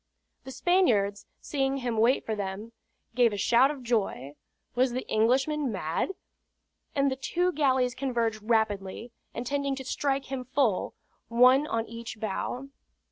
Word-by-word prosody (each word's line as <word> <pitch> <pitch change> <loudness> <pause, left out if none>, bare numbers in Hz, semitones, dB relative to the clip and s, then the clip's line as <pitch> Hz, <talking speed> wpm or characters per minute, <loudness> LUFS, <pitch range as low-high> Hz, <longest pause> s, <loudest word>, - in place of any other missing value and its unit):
The 265 - -7
Spaniards, 230 - +2
seeing 270 -1 -1
him 245 -3 -2
wait 230 +4 +3
for 220 - -2
them, 205 +2 -5 0.4
gave 240 -1 +4
a - - -3
shout 240 +6 +4
of 285 -3 -6
joy 205 - -1 0.4
was 250 0 +2
the 255 - -4
Englishman 265 +5 +2
mad? 170 - -2 0.9
And 275 -1 +2
the - - -1
two 350 +7 0
galleys 260 -5 +2
converged 235 -4 -1
rapidly, 220 0 -1 0.2
intending 280 +3 -1
to 265 -1 -7
strike 275 0 -1
him 265 -2 -3
full, 255 -6 0 0.3
one 255 +5 +5
on 225 -4 -1
each 230 -1 -8
bow. 235 +5 -3
245 Hz, 140 wpm, -28 LUFS, 220-270 Hz, 0.9 s, one